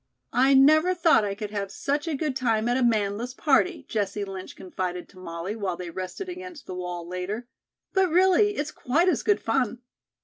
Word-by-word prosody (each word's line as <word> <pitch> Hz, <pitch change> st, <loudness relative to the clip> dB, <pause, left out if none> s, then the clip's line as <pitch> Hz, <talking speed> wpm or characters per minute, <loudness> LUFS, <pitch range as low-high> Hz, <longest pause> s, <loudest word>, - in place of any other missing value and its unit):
"I 265 Hz, +2 st, +5 dB
never 310 Hz, +7 st, +5 dB
thought 335 Hz, -9 st, +4 dB
I 200 Hz, -1 st, -2 dB
could 210 Hz, 0 st, -6 dB
have 200 Hz, -2 st, -3 dB
such 290 Hz, -, -2 dB
a 320 Hz, -, -1 dB
good 285 Hz, -1 st, -2 dB
time 225 Hz, -3 st, +1 dB
at 245 Hz, -, +2 dB
a 260 Hz, -, +1 dB
manless 225 Hz, +1 st, 0 dB
party," 305 Hz, +2 st, +2 dB
Jessie 205 Hz, -1 st, -2 dB
Lynch 190 Hz, -1 st, -8 dB
confided 180 Hz, -1 st, -4 dB
to 185 Hz, -, -16 dB
Molly 170 Hz, +3 st, -5 dB
while 195 Hz, -5 st, -3 dB
they 180 Hz, -2 st, -6 dB
rested 185 Hz, -, -5 dB
against 360 Hz, -3 st, -8 dB
the -, -, -7 dB
wall 180 Hz, -1 st, -5 dB
later. 185 Hz, +7 st, -4 dB, 0.5 s
"But, 385 Hz, -2 st, +3 dB
really, 380 Hz, +4 st, +4 dB
it's 295 Hz, +1 st, -3 dB
quite 330 Hz, +9 st, +1 dB
as -, -, +1 dB
good 415 Hz, -, +2 dB
fun." 245 Hz, +1 st, -1 dB
240 Hz, 195 wpm, -26 LUFS, 195-310 Hz, 0.5 s, I